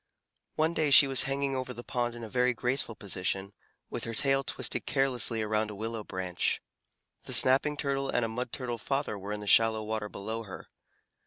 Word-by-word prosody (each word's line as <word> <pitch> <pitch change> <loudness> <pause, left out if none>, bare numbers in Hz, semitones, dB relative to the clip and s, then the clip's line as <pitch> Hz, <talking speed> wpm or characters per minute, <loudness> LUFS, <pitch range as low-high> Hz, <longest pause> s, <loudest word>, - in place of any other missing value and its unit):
One 160 +2 +1
day 155 -3 +1
she 140 +1 +10
was 135 0 +3
hanging 135 0 -1
over 130 -1 -4
the 120 - -8
pond 120 -1 -2
in 120 - -8
a - - -5
very 125 +2 +1
graceful 125 -1 0
position, 95 -1 -2 0.4
with - - -4
her 115 - -4
tail 135 +3 +3
twisted 130 -2 -2
carelessly 125 -4 +2
around 110 0 0
a 105 - -7
willow 110 +1 -5
branch. 95 -3 -2 0.7
The - - -3
Snapping 140 +3 +4
Turtle 135 -1 -1
and 120 - +1
a - - -1
Mud 120 +2 -4
Turtle 120 -3 -4
Father 140 -3 -2
were 100 +2 -6
in 105 0 -4
the - - -7
shallow 110 +1 +4
water 110 -1 -3
below 110 +4 -5
her. 95 -4 -10
120 Hz, 195 wpm, -29 LUFS, 110-135 Hz, 0.7 s, she